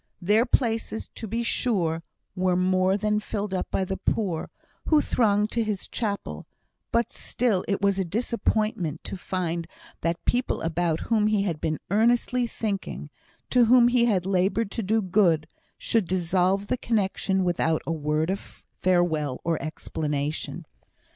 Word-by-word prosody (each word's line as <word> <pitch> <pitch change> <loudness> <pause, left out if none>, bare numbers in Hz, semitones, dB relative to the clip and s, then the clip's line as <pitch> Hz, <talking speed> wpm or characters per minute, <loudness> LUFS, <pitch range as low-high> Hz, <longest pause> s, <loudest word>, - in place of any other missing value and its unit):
Their 210 +7 +3
places, 225 -3 0
to 225 - -6
be 230 +3 -2
sure, 175 -10 0 0.3
were 185 -1 +1
more 185 +1 +2
than 210 +1 +1
filled 205 -1 -4
up 185 - -2
by 190 - 0
the 190 0 -3
poor, 185 -8 -1 0.4
who 310 - +5
thronged 210 -6 +2
to 235 - +1
his 210 -3 -3
chapel; 205 -3 -4 0.4
but 235 0 +1
still 225 -7 0
it 200 -1 -1
was 200 -1 +3
a - - +2
disappointment 215 -4 -1
to - - -5
find 175 -3 -3 0.3
that 170 +1 -2
people 250 +1 0
about 165 0 0
whom 215 -2 +2
he 210 -2 +2
had 170 -6 -2
been 155 -1 0
earnestly 240 +3 +2
thinking 210 -4 -4 0.4
to 250 -2 +5
whom 240 +1 +6
he 245 -1 +4
had 195 -6 +1
laboured 195 +3 +1
to - - -2
do 220 +2 +1
good 175 -5 +3 0.3
should 220 -6 0
dissolve 185 +2 +1
the 255 - -1
connexion 195 -4 0
without 165 -3 +1
a - - -2
word 155 +1 0
of 195 - -7
farewell 160 -7 +1
or 165 -1 0
explanation. 150 -2 -3
195 Hz, 155 wpm, -26 LUFS, 175-220 Hz, 0.4 s, whom